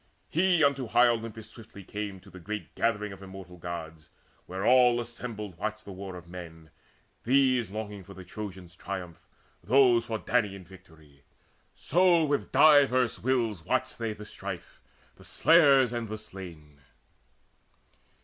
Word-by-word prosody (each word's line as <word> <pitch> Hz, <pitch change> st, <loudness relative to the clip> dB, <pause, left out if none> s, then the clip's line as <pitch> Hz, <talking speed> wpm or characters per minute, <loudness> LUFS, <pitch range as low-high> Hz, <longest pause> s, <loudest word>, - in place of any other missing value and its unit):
He 175 Hz, -1 st, +3 dB
unto 140 Hz, -3 st, +2 dB
high 120 Hz, +2 st, +5 dB
Olympus 115 Hz, -2 st, -3 dB
swiftly 110 Hz, -3 st, -13 dB
came, 100 Hz, 0 st, -6 dB
To 95 Hz, -, -17 dB
the 90 Hz, -, -11 dB
great 100 Hz, 0 st, -6 dB
gathering 105 Hz, -3 st, -1 dB
of 95 Hz, -, -13 dB
immortal 95 Hz, -2 st, -11 dB
Gods, 80 Hz, -2 st, -7 dB, 0.4 s
Where 95 Hz, +2 st, -4 dB
all 125 Hz, -1 st, +5 dB
assembled 115 Hz, -6 st, -7 dB
watched 110 Hz, 0 st, -4 dB
the 100 Hz, -, -8 dB
war 95 Hz, 0 st, -7 dB
of 90 Hz, -1 st, -11 dB
men, 80 Hz, -3 st, -10 dB, 0.5 s
These 130 Hz, -3 st, +3 dB
longing 105 Hz, -1 st, -6 dB
for 100 Hz, +1 st, -13 dB
the 95 Hz, -, -10 dB
Trojans' 95 Hz, -2 st, -8 dB
triumph, 90 Hz, -4 st, -6 dB, 0.4 s
those 120 Hz, +2 st, +4 dB
For 110 Hz, -, -2 dB
Danaan 105 Hz, -5 st, -1 dB
victory; 80 Hz, -6 st, -18 dB, 0.5 s
so 175 Hz, -1 st, +3 dB
with 145 Hz, -1 st, -1 dB
diverse 135 Hz, -4 st, +5 dB
wills 115 Hz, -8 st, 0 dB
Watched 130 Hz, +7 st, -1 dB
they 115 Hz, -2 st, -2 dB
the 105 Hz, 0 st, -10 dB
strife, 100 Hz, -4 st, -8 dB, 0.4 s
the -, -, -16 dB
slayers 140 Hz, -7 st, +5 dB
and 120 Hz, -2 st, -4 dB
the 110 Hz, -, -4 dB
slain. 85 Hz, -8 st, -11 dB
105 Hz, 145 wpm, -28 LUFS, 90-125 Hz, 0.5 s, high